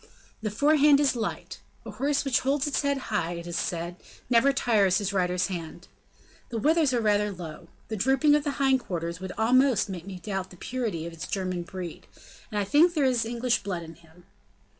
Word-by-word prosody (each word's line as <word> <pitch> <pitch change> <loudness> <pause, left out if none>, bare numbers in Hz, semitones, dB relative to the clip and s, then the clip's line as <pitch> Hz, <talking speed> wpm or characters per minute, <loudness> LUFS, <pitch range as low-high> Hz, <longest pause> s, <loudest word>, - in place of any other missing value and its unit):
The 215 - -1
forehand 290 +5 +4
is 285 -3 +2
light. 230 - -4 0.3
A 225 - -6
horse 280 +7 0
which 265 -4 +2
holds 275 +2 0
its 290 - 0
head 280 -1 0 0.2
high, 175 -4 0
it 170 0 -7
is 175 -1 -5
said, 170 0 -3 0.3
never 245 +4 +5
tires 215 -8 +2
his 200 -1 -2
rider's 180 -1 +1
hand. 175 -1 -6 0.6
The 235 - -4
withers 305 +4 +3
are 245 - +1
rather 210 -2 +2
low. 170 -5 -9 0.2
The 220 - -3
drooping 270 +7 +3
of 295 -1 +3
the 290 -2 -2
hind 270 -1 +3
quarters 170 -6 -4
would 190 0 -6
almost 245 0 +3
make 185 -1 -7
me 190 -2 -6
doubt 190 +1 -4
the 180 - -14
purity 220 -8 -3
of 170 - -7
its 165 - -7
German 185 -3 -2
breed, 175 -1 -8 0.4
and 210 - -3
I 205 - +2
think 310 - +4
there 295 -3 +2
is 245 -3 +2
English 240 +1 0
blood 180 -4 -4
in 165 0 -10
him. 165 +1 -21
210 Hz, 205 wpm, -27 LUFS, 180-270 Hz, 0.6 s, never